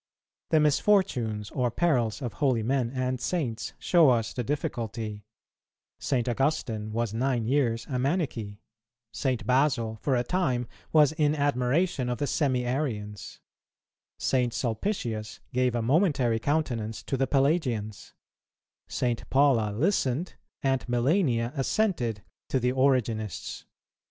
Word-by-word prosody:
The 160 Hz, -, +4 dB
misfortunes 140 Hz, -, +2 dB
or 125 Hz, -2 st, 0 dB
perils 125 Hz, -4 st, 0 dB
of 120 Hz, -, -3 dB
holy 130 Hz, -6 st, +2 dB
men 130 Hz, 0 st, +1 dB
and 130 Hz, 0 st, -2 dB
saints 120 Hz, -10 st, -2 dB
show 170 Hz, -5 st, +4 dB
us 115 Hz, -3 st, +1 dB
the 125 Hz, -, -2 dB
difficulty; 115 Hz, -6 st, -4 dB, 0.7 s
St. 125 Hz, -3 st, 0 dB
Augustine 120 Hz, -5 st, -1 dB
was 115 Hz, -1 st, -1 dB
nine 120 Hz, 0 st, 0 dB
years 115 Hz, -3 st, +1 dB
a 130 Hz, -2 st, -3 dB
Manichee; 130 Hz, -, -1 dB, 0.5 s
St. 130 Hz, -1 st, -2 dB
Basil 125 Hz, -4 st, +1 dB
for 135 Hz, -, +1 dB
a 120 Hz, -, +1 dB
time 125 Hz, -6 st, 0 dB, 0.2 s
was 150 Hz, -2 st, +5 dB
in 155 Hz, -2 st, +1 dB
admiration 140 Hz, +1 st, +1 dB
of 125 Hz, -, -1 dB
the 145 Hz, -, -1 dB
Semi 130 Hz, -3 st, 0 dB
arians; 110 Hz, -7 st, -4 dB, 0.8 s
St. 125 Hz, -2 st, +1 dB
Sulpicius 115 Hz, -, -2 dB
gave 125 Hz, -1 st, +1 dB
a 120 Hz, -, 0 dB
momentary 135 Hz, -, +2 dB
countenance 120 Hz, -6 st, -1 dB
to -, -, -2 dB
the 135 Hz, 0 st, +1 dB
Pelagians; 135 Hz, -, 0 dB, 0.7 s
St. 120 Hz, -2 st, -2 dB
Paula 130 Hz, -6 st, +3 dB
listened, 145 Hz, -, 0 dB, 0.3 s
and 135 Hz, -1 st, +1 dB
Melania 120 Hz, -1 st, +1 dB
assented, 135 Hz, -, 0 dB, 0.3 s
to 130 Hz, -, +1 dB
the 125 Hz, 0 st, +1 dB
Origenists. 120 Hz, -, 0 dB
125 Hz, 125 wpm, -27 LUFS, 115-145 Hz, 0.8 s, was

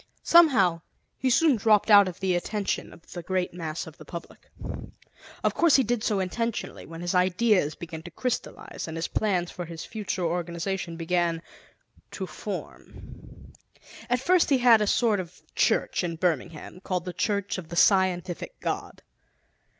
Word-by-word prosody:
Somehow, 225 Hz, -, +5 dB, 0.3 s
he 260 Hz, -, 0 dB
soon 305 Hz, +2 st, +4 dB
dropped 215 Hz, 0 st, +3 dB
out 200 Hz, -1 st, +8 dB
of 180 Hz, -1 st, -6 dB
the 190 Hz, -1 st, +1 dB
attention 200 Hz, +3 st, -2 dB
of 165 Hz, -, -17 dB
the 175 Hz, -, -6 dB
great 185 Hz, +1 st, -2 dB
mass 165 Hz, -2 st, -4 dB
of 160 Hz, -2 st, -12 dB
the -, -, -10 dB
public. 170 Hz, -1 st, -10 dB, 0.9 s
Of -, -, +2 dB
course, 335 Hz, -3 st, +4 dB
he 270 Hz, -, +5 dB
did 235 Hz, -1 st, -1 dB
so 210 Hz, -3 st, +1 dB
intentionally, 230 Hz, +5 st, -3 dB
when 165 Hz, +1 st, -9 dB
his 175 Hz, +1 st, -2 dB
ideas 180 Hz, -2 st, +2 dB
began 165 Hz, -2 st, -8 dB
to 175 Hz, -, -10 dB
crystallize 245 Hz, +1 st, -4 dB
and 160 Hz, 0 st, -6 dB
his 165 Hz, -, -2 dB
plans 185 Hz, -5 st, 0 dB
for 175 Hz, -, -6 dB
his 165 Hz, -1 st, -8 dB
future 205 Hz, -4 st, -4 dB
organization 170 Hz, +1 st, -3 dB
began 170 Hz, -1 st, 0 dB, 0.7 s
to -, -, -4 dB
form. -, -, -9 dB, 0.6 s
At 245 Hz, +1 st, +2 dB
first 355 Hz, +6 st, +3 dB
he 275 Hz, -, +4 dB
had 240 Hz, -3 st, +6 dB
a 210 Hz, -, +1 dB
sort 220 Hz, -1 st, +2 dB
of 180 Hz, -1 st, -8 dB
church -, -, +1 dB
in 170 Hz, -1 st, -2 dB
Birmingham, 165 Hz, 0 st, -2 dB
called 185 Hz, -2 st, -3 dB
The 180 Hz, -, -5 dB
Church 200 Hz, -2 st, -1 dB
of 165 Hz, -3 st, -10 dB
the 170 Hz, -, -6 dB
Scientific 185 Hz, -2 st, +2 dB
God. -, -, -4 dB
185 Hz, 165 wpm, -26 LUFS, 170-215 Hz, 0.9 s, out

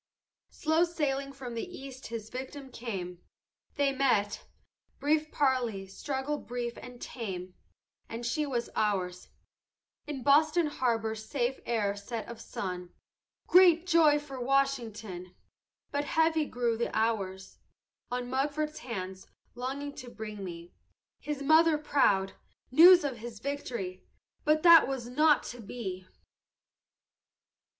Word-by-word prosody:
"Slow 315 Hz, +2 st, +2 dB
sailing 280 Hz, -5 st, -1 dB
from 265 Hz, -3 st, -8 dB
the 230 Hz, -, -3 dB
east 270 Hz, -1 st, -9 dB
his 225 Hz, -1 st, -6 dB
victim 265 Hz, +1 st, -7 dB
came. 185 Hz, -8 st, -5 dB, 0.5 s
They 280 Hz, -1 st, +2 dB
met; 255 Hz, -7 st, +1 dB, 0.5 s
brief 310 Hz, +1 st, +1 dB
parley; 245 Hz, -8 st, +1 dB
struggle 270 Hz, +8 st, -3 dB
brief 240 Hz, -1 st, -4 dB
and 250 Hz, -1 st, -11 dB
tame, 185 Hz, -8 st, -6 dB, 0.6 s
And 230 Hz, +1 st, -5 dB
she 300 Hz, +5 st, 0 dB
was 240 Hz, -3 st, -2 dB
ours; 185 Hz, -4 st, -1 dB, 0.8 s
In 280 Hz, -4 st, -5 dB
Boston 310 Hz, +5 st, +4 dB
harbor 230 Hz, -6 st, 0 dB
safe 240 Hz, +4 st, -2 dB
ere 210 Hz, -4 st, 0 dB
set 215 Hz, +2 st, -6 dB
of 235 Hz, -1 st, -8 dB
sun, 180 Hz, -2 st, -5 dB, 0.5 s
Great 355 Hz, -2 st, +6 dB
joy 325 Hz, -4 st, +5 dB
for 280 Hz, -3 st, -7 dB
Washington! 225 Hz, -9 st, -1 dB, 0.6 s
But 285 Hz, 0 st, -1 dB
heavy 320 Hz, 0 st, +2 dB
grew 235 Hz, -2 st, -1 dB
the 235 Hz, -, -1 dB
hours 195 Hz, -4 st, -1 dB, 0.5 s
On 245 Hz, 0 st, -3 dB
Mugford's 300 Hz, +4 st, -1 dB
hands, 190 Hz, -8 st, -6 dB, 0.3 s
longing 275 Hz, +4 st, -4 dB
to 250 Hz, -, -8 dB
bring 215 Hz, -2 st, -7 dB
to -, -, -8 dB
me, 170 Hz, -2 st, -8 dB, 0.5 s
His 295 Hz, -2 st, -4 dB
mother 315 Hz, +2 st, +5 dB
proud, 235 Hz, -10 st, +2 dB, 0.4 s
news 350 Hz, +5 st, +9 dB
of 270 Hz, -4 st, -2 dB
his 230 Hz, 0 st, -8 dB
victory; 235 Hz, -9 st, -4 dB, 0.4 s
But 305 Hz, +1 st, +3 dB
that 335 Hz, -2 st, +9 dB
was 265 Hz, -3 st, -3 dB
not 300 Hz, +4 st, +4 dB
to 245 Hz, -, -12 dB
be! 190 Hz, -4 st, -6 dB
250 Hz, 125 wpm, -30 LUFS, 220-290 Hz, 0.8 s, news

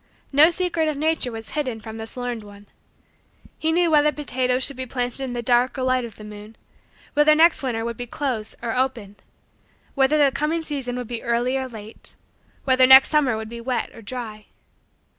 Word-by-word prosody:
No 295 Hz, +3 st, +6 dB
secret 345 Hz, -2 st, -1 dB
of 305 Hz, -2 st, -2 dB
nature 310 Hz, -4 st, 0 dB
was 225 Hz, -1 st, -8 dB
hidden 260 Hz, -7 st, -3 dB
from 220 Hz, 0 st, -9 dB
this 225 Hz, +2 st, -8 dB
learned 245 Hz, -3 st, -4 dB
one. 205 Hz, 0 st, -14 dB, 0.9 s
He 320 Hz, 0 st, 0 dB
knew 340 Hz, 0 st, +2 dB
whether 300 Hz, -1 st, +4 dB
potatoes 255 Hz, -3 st, -1 dB
should 280 Hz, -, +1 dB
be 260 Hz, 0 st, -5 dB
planted 245 Hz, +1 st, -3 dB
in 260 Hz, -2 st, -4 dB
the 240 Hz, -1 st, -4 dB
dark 245 Hz, +2 st, +2 dB
or 260 Hz, -, -2 dB
light 255 Hz, -1 st, +1 dB
of 230 Hz, -, -10 dB
the 215 Hz, -, -12 dB
moon: 210 Hz, +1 st, -11 dB, 0.6 s
whether 300 Hz, +1 st, +5 dB
next 330 Hz, +2 st, +4 dB
winter 235 Hz, -4 st, -2 dB
would 235 Hz, -1 st, -4 dB
be 245 Hz, -, -6 dB
"close" 240 Hz, -5 st, -3 dB
or 230 Hz, 0 st, -2 dB
"open": 245 Hz, -6 st, -2 dB, 0.8 s
whether 275 Hz, +2 st, +3 dB
the 285 Hz, -2 st, +4 dB
coming 300 Hz, +4 st, -1 dB
season 270 Hz, -5 st, -4 dB
would 250 Hz, -2 st, -5 dB
be 235 Hz, -1 st, -5 dB
"early" 240 Hz, +2 st, 0 dB
or 265 Hz, -1 st, -2 dB
"late": 220 Hz, -2 st, -10 dB, 0.5 s
whether 260 Hz, -1 st, +4 dB
next 265 Hz, +1 st, +9 dB
summer 280 Hz, -7 st, +2 dB
would 220 Hz, 0 st, -6 dB
be 235 Hz, +1 st, -8 dB
"wet" 250 Hz, +1 st, -2 dB
or 230 Hz, -, -12 dB
"dry." 215 Hz, -2 st, -7 dB
255 Hz, 200 wpm, -23 LUFS, 230-285 Hz, 0.9 s, next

